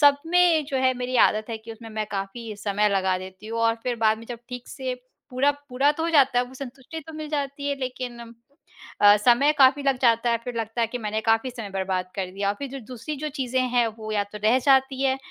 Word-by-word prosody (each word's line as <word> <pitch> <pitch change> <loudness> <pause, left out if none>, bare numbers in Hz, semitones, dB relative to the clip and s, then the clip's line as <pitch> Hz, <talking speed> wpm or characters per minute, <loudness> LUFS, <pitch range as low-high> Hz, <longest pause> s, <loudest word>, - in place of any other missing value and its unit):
सब 285 -1 +7
में 345 -2 +4
जो 275 - -2
है 260 0 +3
मेरी 250 +1 -2
आदत 215 +2 -4
है 225 - -4
कि 225 +1 -10
उसमें 225 0 -11
मैं 215 0 -3
काफ़ी 210 +3 -5
समय 205 0 +1
लगा 190 -2 +1
देती 185 +2 -10
हूँ 230 +1 -3
और 230 0 +3
फिर 250 -1 -1
बाद 220 -1 +2
में 230 - -12
जब 240 - -5
ठीक 250 -1 -8
से 260 -2 -4 0.4
पूरा 260 +3 +3 0.2
पूरा 270 +3 +2
तो 320 - -4
हो 335 - 0
जाता 270 -5 +4
है 245 - +2
वो 255 - -14
संतुष्टि 265 +4 -8
तो - - -7
मिल 310 -1 -6
जाती 280 -1 -3
है 280 - -1
लेकिन 255 -2 -5 0.8
अ, 205 0 +8
समय 245 +7 +4
काफ़ी 270 +1 +6
लग 275 -2 +1
जाता 235 -1 +3
है। 230 - +2
फिर 245 - -5
लगता 225 +1 -3
है 230 - +3
कि 245 - -5
मैंने 215 -1 -2
काफ़ी 225 +3 +2
समय 230 -5 -7
बर्बाद 190 -1 -2
कर 190 -2 -1
दिया 200 +1 -2
और 200 - +1
फिर 280 - -5
जो 275 - -6
दूसरी 255 +5 -6
जो 305 +2 -3
चीज़ें 260 -2 0
हैं 240 -1 +3
वो 215 0 -6
या 205 -1 +1
तो 210 - -6
रह 230 +4 +5
जाती 265 -1 +4
है 265 -1 +2
245 Hz, 250 wpm, -25 LUFS, 220-270 Hz, 0.8 s, अ